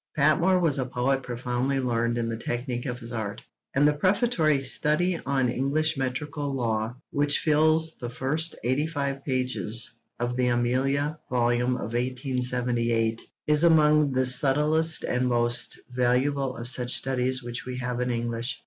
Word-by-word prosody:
Patmore 160 +5 +3
was 160 -6 +2
a 130 - 0
poet 130 +2 0
profoundly 125 +2 -2
learned 120 -2 0
in 115 -1 -1
the 115 - -3
technique 120 +2 -4
of 120 -1 -3
his 115 0 -10
art, 110 -4 -5 0.3
and 145 +2 +4
the 150 - +3
Prefatory 165 - +1
Study 155 +6 +1
on 135 -2 +1
English 145 +6 0
Metrical 140 +2 -3
Law, 115 -2 -2 0.2
which 145 0 +1
fills 160 +1 +2
the 120 - -5
first 150 +7 -2
eighty 130 +6 0
five 140 -3 -3
pages 125 -3 -1 0.3
of 120 0 -2
the 125 -1 +2
Amelia 135 +5 0
volume 120 0 +1
of 115 -1 -5
1878, 125 -2 -1 0.2
is 150 +1 +3
among 150 -3 +4
the 130 0 +1
subtlest 150 +4 +3
and 125 0 0
most 120 -1 0 0.2
valuable 130 +2 +1
of 120 +1 -3
such 125 -1 +3
studies 130 0 +1
which 120 +1 -6
we 125 0 -5
have 125 -1 -3
in 125 - -1
English. 115 0 -3
130 Hz, 155 wpm, -26 LUFS, 120-145 Hz, 0.3 s, and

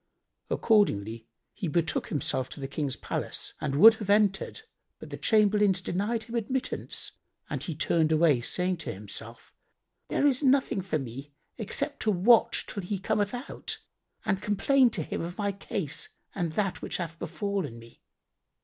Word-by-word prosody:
Accordingly 115 - +2 0.3
he 195 - -4
betook 165 +1 0
himself 130 -2 -1
to - - -9
the 135 - -4
King's 140 -1 -2
palace - - -3
and 135 - -1
would 225 +10 +9
have 200 - -5
entered, 205 - +2 0.4
but - - -11
the - - -3
chamberlains 210 -3 +3
denied 205 +5 -1
him 235 +1 -11
admittance, 240 +3 -2 0.4
and - - -2
he 165 - -4
turned 160 +1 +2
away, 155 -5 +4
saying 180 +6 0
in - - -2
himself, 110 +4 -7 0.5
"There - - +1
is 275 -2 +3
nothing 265 -7 +3
for 180 -4 -1
me 135 +2 -7 0.2
except 280 +7 -2
to 220 - 0
watch 215 +4 +4
till 200 - -5
he 195 +3 -3
cometh 205 +3 0
out 245 +3 -4 0.5
and 195 -3 0
complain 250 +5 +3
to 190 -8 -2
him - - -4
of 175 +2 -5
my 205 -1 0
case 195 -5 -3 0.2
and 170 -5 -2
that 195 +1 -1
which - - -3
hath 165 -2 -5
befallen 175 - -3
me." 115 0 -15
190 Hz, 160 wpm, -28 LUFS, 155-215 Hz, 0.5 s, would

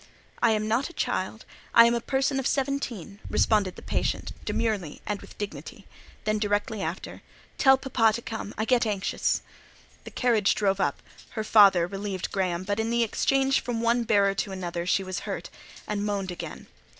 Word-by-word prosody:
"I - - +5
am 215 0 -1
not 235 +7 +1
a - - -13
child—I 230 -7 +1
am 235 - +4
a 235 - 0
person 270 +2 0
of 265 - 0
seventeen," 260 - -2
responded 205 -4 +2
the - - -12
patient, - - -2
demurely 210 -9 -1
and 205 0 -3
with - - -14
dignity. 205 -1 -7 0.4
Then, 215 0 0
directly 205 0 -1
after: - - -5 0.4
"Tell 265 -1 +6
papa 255 -4 +2
to 235 - -3
come; 220 -2 -5
I 220 - 0
get 240 -1 +3
anxious." 200 -2 0 0.6
The - - -8
carriage 225 -5 +2
drove 195 -2 +1
up; 145 -6 -1 0.3
her 220 - 0
father 200 -5 +6
relieved 195 0 -4
Graham; 185 -2 -1
but 205 +2 -2
in 220 +1 0
the 235 0 +2
exchange 270 +4 +2
from 240 -2 -3
one 235 +1 +2
bearer 200 -3 +3
to 195 0 -3
another 175 -2 -4
she 195 - +2
was 185 -1 -4
hurt, - - -5 0.4
and 205 -1 -2
moaned 200 -3 -2
again. 175 - -7
210 Hz, 175 wpm, -27 LUFS, 195-235 Hz, 0.6 s, Tell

